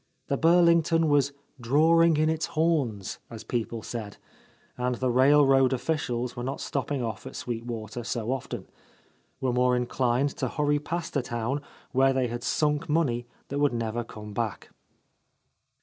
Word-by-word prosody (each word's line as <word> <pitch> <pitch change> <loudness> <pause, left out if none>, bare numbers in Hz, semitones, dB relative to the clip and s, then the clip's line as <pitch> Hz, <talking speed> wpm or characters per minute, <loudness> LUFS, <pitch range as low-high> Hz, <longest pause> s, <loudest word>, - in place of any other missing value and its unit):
The 140 - +2
Burlington 170 -1 +4
was 140 -1 +3 0.3
"drawing 160 +6 +4
in 155 +1 +3
its 160 0 0
horns," 145 - 0
as 115 -1 -8
people 115 -2 -3
said, 110 -4 -6 0.6
and 125 0 -1
the 130 +1 0
railroad 135 0 +5
oificials 125 -3 -2
were 120 - -5
not 135 +2 -3
stopping 140 -1 -2
off 110 -2 -5
at - - -9
Sweet 115 -1 -4
Water 115 0 -5
so 115 0 -2
often, 135 -1 -4 0.4
— 135 - -23
^were 130 -2 +1
more 125 0 +3
inclined 125 +2 +1
to - - -1
hurry 145 -1 +1
past 165 +3 -4
a 140 - +2
town 120 +4 -2 0.3
where 135 +1 +4
they 130 -2 0
had 120 +1 -4
sunk 150 +5 0
money 130 -7 +1 0.2
that 140 - -2
would 145 -3 +3
never 115 0 -2
come 105 -2 -10
back. 110 -2 -3
130 Hz, 160 wpm, -27 LUFS, 120-150 Hz, 0.6 s, railroad